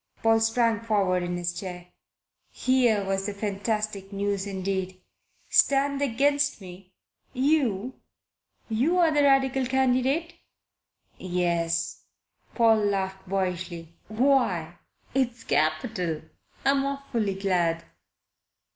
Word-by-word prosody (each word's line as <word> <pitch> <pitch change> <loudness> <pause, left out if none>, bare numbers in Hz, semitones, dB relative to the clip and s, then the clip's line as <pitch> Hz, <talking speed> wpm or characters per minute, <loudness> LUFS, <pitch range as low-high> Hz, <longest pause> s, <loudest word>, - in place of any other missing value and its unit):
Paul 225 0 +4
sprang 225 0 +2
forward 200 -5 +1
in 175 0 -3
his 175 0 -2
chair. 180 -1 -7 0.6
Here 245 -6 +2
was 195 +1 -1
fantastic 205 0 -3
news 200 0 -2
indeed! 190 -1 -3 0.5
"Stand 280 0 +3
against 285 +2 +1
me? 185 0 -13 0.4
You? 260 -5 0 0.7
You're 320 +9 +2
the 295 -1 +3
Radical 270 -2 +3
candidate?" 265 +5 +1 0.9
"Yes." 170 -2 -1 0.5
Paul 225 -2 +5
laughed 190 -2 -2
boyishly. 180 -3 -3
"Why, 215 - +1 0.3
it's 245 -3 -1
capital! 160 +1 -1 0.4
I'm 275 0 +3
awfully 270 -8 -2
glad." 175 -4 0
205 Hz, 95 wpm, -26 LUFS, 185-260 Hz, 0.9 s, Paul